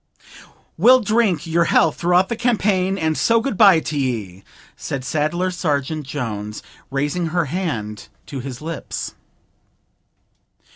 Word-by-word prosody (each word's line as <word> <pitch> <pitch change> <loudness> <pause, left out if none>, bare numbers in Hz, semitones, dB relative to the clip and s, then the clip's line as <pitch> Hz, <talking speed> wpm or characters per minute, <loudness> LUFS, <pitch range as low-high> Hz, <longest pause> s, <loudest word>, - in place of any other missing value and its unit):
'We'll 250 +7 +7
drink 215 -4 +1
your 170 +1 +2
health - - +3
throughout 180 +2 +3
the 235 - -2
campaign, 205 -5 +1
and 160 -3 0
so 230 +7 +3
good 245 0 -2
bye 195 -5 +7
t'ye,' 115 -12 -3 0.3
said 130 -2 -5
Saddler 160 +6 0
sergeant 150 -3 -2
Jones, 105 -6 -5 0.3
raising 145 +6 -1
her 170 +1 0
hand 125 - -4 0.2
to 140 - -6
his 130 0 -7
lips. 165 0 -5
160 Hz, 125 wpm, -20 LUFS, 135-190 Hz, 0.3 s, We'll